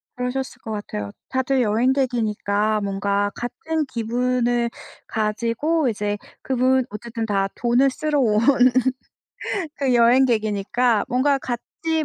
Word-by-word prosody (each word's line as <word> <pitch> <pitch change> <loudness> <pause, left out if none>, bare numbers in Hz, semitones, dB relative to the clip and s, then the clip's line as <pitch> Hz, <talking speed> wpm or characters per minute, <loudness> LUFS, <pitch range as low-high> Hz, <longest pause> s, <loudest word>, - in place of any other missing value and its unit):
그러셨을 255 +1 -4
것 220 - -7
같아요. 105 - -5 0.2
다들 260 0 +1
여행객이니까 220 -3 +1
뭔가 200 0 0
같은 310 +6 -3
기분을 240 0 0 0.4
가지고 235 +8 0
이제 205 -1 -2 0.2
그분 260 0 +2
어쨌든 225 +2 -5
다 195 -2 +1
돈을 245 +3 +3
쓰러 295 +2 -1
온 215 -5 +3 1.4
그 270 -3 +1
여행객이니까 235 -2 +3
뭔가 270 +2 +2
같이 310 +6 -3
240 Hz, 250 characters per minute, -22 LUFS, 215-260 Hz, 1.4 s, 돈을